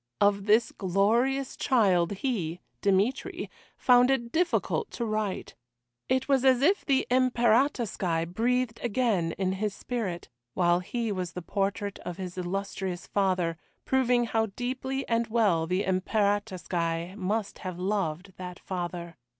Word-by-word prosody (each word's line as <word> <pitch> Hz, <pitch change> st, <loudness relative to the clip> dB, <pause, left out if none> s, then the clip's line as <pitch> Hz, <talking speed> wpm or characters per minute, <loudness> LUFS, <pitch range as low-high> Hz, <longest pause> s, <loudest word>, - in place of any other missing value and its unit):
Of 200 Hz, 0 st, +2 dB
this 220 Hz, +3 st, +4 dB
glorious 230 Hz, +8 st, +1 dB
child 195 Hz, -10 st, +3 dB
he 190 Hz, -7 st, -2 dB, 0.2 s
Dmitry 200 Hz, +6 st, 0 dB, 0.3 s
found 250 Hz, 0 st, +5 dB
it 240 Hz, -3 st, 0 dB
difficult 360 Hz, -, 0 dB
to 235 Hz, -, -2 dB
write. 215 Hz, -3 st, -2 dB, 0.6 s
It 260 Hz, 0 st, +1 dB
was 270 Hz, -2 st, +3 dB
as 260 Hz, -1 st, +4 dB
if 380 Hz, +6 st, +3 dB
the 270 Hz, -2 st, +2 dB
Imperatorskoye 235 Hz, -, +2 dB
breathed 240 Hz, +1 st, 0 dB
again 210 Hz, -8 st, +1 dB
in 190 Hz, -1 st, -1 dB
his 200 Hz, +1 st, -2 dB
spirit, 205 Hz, -9 st, -4 dB, 0.3 s
while 175 Hz, -1 st, +3 dB
he 230 Hz, +4 st, -3 dB
was 185 Hz, -3 st, -3 dB
the 180 Hz, -, -6 dB
portrait 200 Hz, +1 st, -2 dB
of 180 Hz, -1 st, -6 dB
his 185 Hz, -2 st, -6 dB
illustrious 185 Hz, 0 st, -3 dB
father, 185 Hz, -4 st, 0 dB, 0.3 s
proving 250 Hz, -2 st, +3 dB
how 225 Hz, -1 st, +1 dB
deeply 265 Hz, +2 st, -3 dB
and 230 Hz, 0 st, +1 dB
well 205 Hz, -8 st, +2 dB
the 185 Hz, +3 st, 0 dB
Imperatorskoye 185 Hz, -3 st, -1 dB
must 205 Hz, +1 st, -2 dB
have 185 Hz, -2 st, -5 dB
loved 185 Hz, -1 st, -2 dB
that 180 Hz, -1 st, -7 dB
father. 175 Hz, -2 st, -5 dB
205 Hz, 135 wpm, -28 LUFS, 180-240 Hz, 0.6 s, found